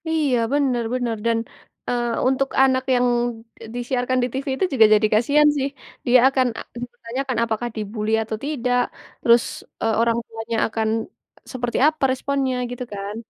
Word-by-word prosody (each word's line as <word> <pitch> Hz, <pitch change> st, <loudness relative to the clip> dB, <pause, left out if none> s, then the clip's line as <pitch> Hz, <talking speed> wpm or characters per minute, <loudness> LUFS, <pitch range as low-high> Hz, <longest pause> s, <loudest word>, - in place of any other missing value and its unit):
Iya 300 Hz, -6 st, +2 dB, 0.2 s
benar 265 Hz, -5 st, +1 dB
benar, 245 Hz, -3 st, -1 dB
dan, 230 Hz, -1 st, +2 dB, 0.5 s
eee, 240 Hz, -1 st, 0 dB, 0.2 s
untuk 265 Hz, +1 st, +1 dB
anak 260 Hz, -1 st, +2 dB
yang, 245 Hz, 0 st, +3 dB, 0.6 s
e -, -, -8 dB
disiarkan 245 Hz, +1 st, -1 dB
di 245 Hz, -, +1 dB
TV 270 Hz, +1 st, -4 dB
itu 375 Hz, -, +1 dB
juga 225 Hz, -4 st, +7 dB
jadi 215 Hz, 0 st, +3 dB
kasihan 290 Hz, +7 st, +4 dB
sih, 275 Hz, 0 st, 0 dB, 0.4 s
dia 250 Hz, +1 st, +6 dB
akan 260 Hz, -2 st, +2 dB
a -, -, -4 dB, 0.2 s
dipertanyakan, 245 Hz, +2 st, -4 dB
apakah 235 Hz, +1 st, -2 dB
di-bully 215 Hz, 0 st, -3 dB
atau 220 Hz, 0 st, -4 dB
tidak, 250 Hz, -4 st, 0 dB, 0.4 s
terus, 235 Hz, 0 st, +5 dB, 0.4 s
eee, 225 Hz, -, +1 dB
orang 230 Hz, 0 st, +2 dB
tuanya 225 Hz, 0 st, -4 dB
akan, 220 Hz, 0 st, -2 dB, 0.7 s
seperti 245 Hz, -2 st, -2 dB
apa 310 Hz, -1 st, -1 dB
responnya, 265 Hz, 0 st, -1 dB, 0.2 s
gitu 245 Hz, 0 st, -5 dB
kan? 200 Hz, +1 st, -5 dB
245 Hz, 160 wpm, -22 LUFS, 230-265 Hz, 0.7 s, juga